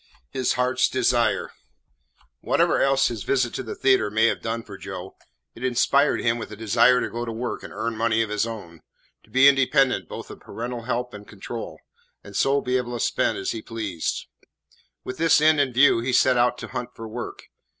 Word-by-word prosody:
IX 65 - -12
HIS 130 - +2
HEART'S 125 +1 +1
DESIRE 120 -2 +1 0.9
Whatever - - +2
else 135 0 +3
his 115 -3 -5
visit 125 +4 0
to - - -3
the 115 - -6
theatre 130 -5 +3
may 110 +2 +2
have 115 - +1
done 115 0 -3
for 100 -3 -10
Joe, 95 -1 -8 0.4
it 115 - -11
inspired 130 +3 +2
him 115 0 +1
with 110 - -7
a - - -7
desire 115 +4 +4
to - - -1
go 120 +1 -4
to 115 - -4
work 120 +2 -4
and - - -10
earn 115 +1 -3
money 115 0 +1
of 110 - -6
his 105 +2 0
own, 85 -8 -9 0.4
to - - -26
be 130 +2 +6
independent 135 -1 +3
both - - -8
of - - -11
parental 120 0 -6
help 125 0 -2
and 105 0 -10
control, 110 +3 -8 0.4
and - - -12
so 140 +1 +2
be 125 0 0
able 120 -1 -3
to - - -8
spend - - 0
as - - -2
he 110 - -5
pleased. 105 -8 -4 0.8
With 130 - -6
this 165 -1 +5
end 155 0 +4
in 135 -2 0
view 130 0 +5
he 125 +2 -2
set 130 +1 +4
out 120 0 +2
to - - -8
hunt 125 -1 -6
for 115 - -8
work. 110 - -7
120 Hz, 210 wpm, -24 LUFS, 110-130 Hz, 0.9 s, be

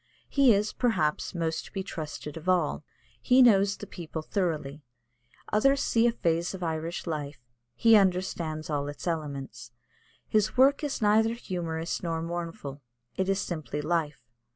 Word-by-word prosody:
He 275 -3 +5
is, 210 0 +1
perhaps, 180 -11 0
most 165 -1 -2
to - - -13
be 195 - -3
trusted 150 -3 -6
of 165 +3 -4
all. 175 -4 +1 0.4
He 255 - +6
knows 200 -4 +4
the - - -8
people 160 -2 -7
thoroughly. 155 -6 -2 0.7
Others 275 +6 +4
see 230 +1 +3
a - - +3
phase 170 -3 -1
of 185 - -7
Irish 165 +1 -3
life; 145 -6 -5 0.3
he 225 -1 +6
understands 180 -5 +1
all 145 -2 -2
its 145 0 -7
elements. 140 - -4 0.6
His 215 +2 +1
work 275 +4 +5
is 285 -6 -2
neither 220 +2 +4
humorous 170 -6 -3
nor 165 -2 -2
mournful; 165 -5 -5 0.3
it 190 0 -1
is 195 0 +1
simply 155 -7 -4
life. 150 -5 -2
170 Hz, 155 wpm, -28 LUFS, 155-205 Hz, 0.7 s, He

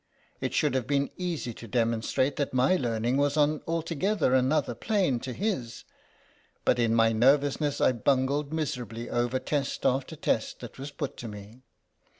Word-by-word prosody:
It - - -3
should - - +2
have 130 -3 -1
been 140 -1 +1
easy 170 -10 -3
to 115 - -10
demon 115 0 +1
strate 130 +4 0
that 140 -3 -2
my 130 +8 +4
learning 120 -3 0
was 145 +1 +1
on 150 0 +2
altogether 165 0 0
another 130 +1 +2
plane 160 - 0
to 130 - -5
his, 130 - -3 0.8
but 125 - +3
in 115 -1 +2
my 115 0 +4
nervous 135 +6 +3
ness 145 -2 0
I - - +4
bungled 135 +4 +1
miserably 120 -7 -4
over 120 +1 +1
test 140 +1 -2
after 135 +4 +1
test 115 -6 -1
that 120 +1 -9
was 140 +2 -5
put 145 -1 -5
to 120 - -6
me. 105 +3 -10
130 Hz, 170 wpm, -28 LUFS, 120-145 Hz, 0.8 s, my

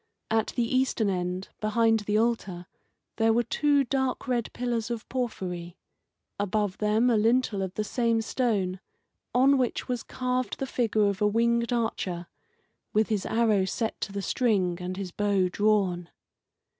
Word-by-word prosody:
At 225 -1 +2
the 240 - +2
eastern 245 -4 +1
end, 180 +1 -3
behind 225 +1 +2
the 210 0 0
altar, 215 -6 -1 0.5
there 225 0 +3
were 235 +2 +3
two 285 +4 +2
dark 265 +1 -1
red 240 -3 -1
pillars 240 -2 -2
of 235 -2 -4
porphyry; 180 -9 -4 0.6
above 205 -1 -1
them 215 +4 +3
a - - +3
lintel 225 -1 +2
of 190 -1 -4
the 215 - -1
same 230 +1 +1
stone, 205 -7 0 0.6
on 270 +2 +5
which 250 -2 -1
was 245 -2 -2
carved 255 0 -2
the 270 - -2
figure 225 -5 +1
of 200 0 -1
a 210 - +4
winged 235 +2 +1
archer, 200 -7 -2 0.7
with 215 +1 +2
his 210 -3 -1
arrow 220 -4 +2
set 220 +3 -3
to - - -3
the 200 0 -4
string 190 -9 +1
and 180 +1 -4
his 195 -2 -5
bow 200 -2 +1
drawn. 190 -4 +1
220 Hz, 155 wpm, -27 LUFS, 195-240 Hz, 0.7 s, on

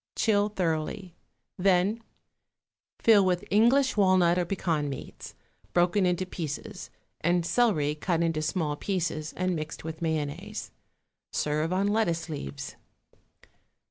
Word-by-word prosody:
Chill 205 -2 +2
thoroughly, 180 0 -2 0.5
then 195 +4 +2 1.0
fill 215 -3 +5
with 180 -1 +1
English 245 +6 +4
walnut 185 -3 +4
or 175 - 0
pecan 165 -5 -1
meats, 135 - -8 0.4
broken 180 +2 +3
into 180 +1 0
pieces, 180 +3 -6 0.3
and 170 +1 +2
celery, 170 -10 +2
cut 170 +2 0
into 165 -2 0
small 155 -1 -1
pieces 160 -3 -2
and 185 0 0
mixed 155 -1 -5
with 160 0 -6
mayonnaise. 160 +6 -3 0.6
Serve 155 +2 0
on 190 +2 +1
lettuce 175 -6 0
leaves. 140 -2 -6
175 Hz, 115 wpm, -28 LUFS, 160-195 Hz, 1.0 s, fill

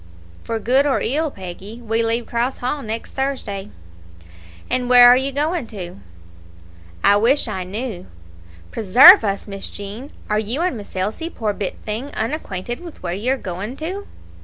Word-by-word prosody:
"For 230 - -2
good 255 +6 +2
or 275 - +2
ill, 305 +6 0
Peggy, 195 +1 -9
we 225 -1 -1
leave 230 +1 0
Cross 240 +2 -1
Hall 255 +4 -2
next 225 -1 -5
Thursday." 240 -8 -3 1.0
"And 250 -1 -1
where 245 -1 +9
are 245 - +8
you 265 +2 0
going 295 0 -1
to?" 180 - -8 1.0
"I 205 - +6
wish 245 +6 +2
I 190 -4 -3
knew." 200 0 -5 0.6
"Preserve 245 - +8
us, 200 -2 -2
Miss 195 -1 -7
Jean! 205 +8 -8 0.2
Are 210 0 +1
you 225 +8 -2
and 355 -6 0
Miss 205 -3 -10
Elsie, 215 - -2
poor 220 -9 -2
bit 200 -2 -4
thing, 220 +6 -3
unacquainted 230 - -3
with 345 - -11
where 175 -1 -2
you 225 +8 0
are - - -2
going 200 +5 -6
to?" 375 +6 -5
230 Hz, 165 wpm, -20 LUFS, 205-270 Hz, 1.0 s, where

